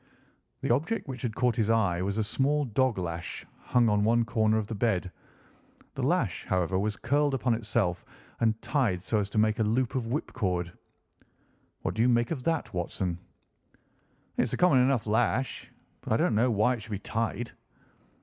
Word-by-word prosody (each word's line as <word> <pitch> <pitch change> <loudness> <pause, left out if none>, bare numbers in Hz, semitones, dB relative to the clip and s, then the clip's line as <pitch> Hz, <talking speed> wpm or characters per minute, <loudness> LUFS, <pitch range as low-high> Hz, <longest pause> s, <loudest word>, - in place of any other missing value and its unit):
The - - +2
object 160 - -1
which 130 -3 -6
had 115 -3 -3
caught 125 -2 +2
his 110 -2 +1
eye 100 -6 +2
was 100 +2 -2
a 110 - +2
small 140 +7 +1
dog 130 0 +1
lash 85 -2 -4 0.2
hung 120 -1 +3
on 105 -1 +2
one 115 +2 +3
corner 110 -2 +2
of 110 - -1
the 115 - -6
bed. 100 -4 0 0.8
The - - -4
lash, - - 0
however, 95 0 0
was 105 +1 -1
curled 145 +2 +1
upon 125 -2 +1
itself 105 -5 -1 0.4
and 110 -1 +1
tied 110 - 0
so 110 +3 0
as 100 -1 -2
to 110 - -5
make 110 0 +3
a - - +3
loop 115 +4 0
of 125 -4 -2
whipcord. 90 - -2 1.1
"What - - -1
do 110 - -1
you 125 - +4
make 120 +2 +2
of 150 -6 -2
that, 165 -1 -1
Watson?" 90 0 -2 1.2
"It's 125 - +1
a - - 0
common 180 -7 +5
enough 125 -2 +2
lash. 120 +4 0 0.3
But - - -2
I - - +4
don't - - +2
know 115 +4 +3
why 110 +2 +3
it 120 - -5
should 110 - -11
be - - -1
tied." 115 +3 -3
115 Hz, 190 wpm, -28 LUFS, 100-125 Hz, 1.2 s, common